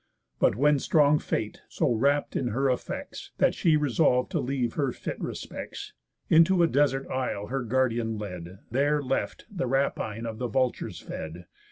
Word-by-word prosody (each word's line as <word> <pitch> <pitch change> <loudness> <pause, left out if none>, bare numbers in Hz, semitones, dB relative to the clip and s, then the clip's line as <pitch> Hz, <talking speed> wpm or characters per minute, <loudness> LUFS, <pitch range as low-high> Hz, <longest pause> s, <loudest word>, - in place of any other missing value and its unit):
But - - +3
when 145 +4 +3
strong 150 +1 +4
Fate 110 -1 -3
so - - 0
wrapt 140 +5 +1
in 130 - 0
her 130 +4 +1
effects, 125 - -5
That - - +3
she 160 -2 +3
resolv'd 140 -3 +2
to - - 0
leave 125 -3 -1
her 140 -4 0
fit - - -6
respects, - - -6 0.3
Into 170 +2 +5
a - - +5
desert 140 -3 +1
isle 125 -6 -2
her 135 +1 -1
guardian 120 -2 0
led, 90 -3 -7
There 145 +3 +2
left, 135 0 -2
the 180 -10 -2
rapine 115 -4 -1
of 110 -1 -5
the 125 - -1
vultures 125 +2 -1
fed. 85 +3 -7
130 Hz, 165 wpm, -27 LUFS, 115-145 Hz, 0.3 s, Into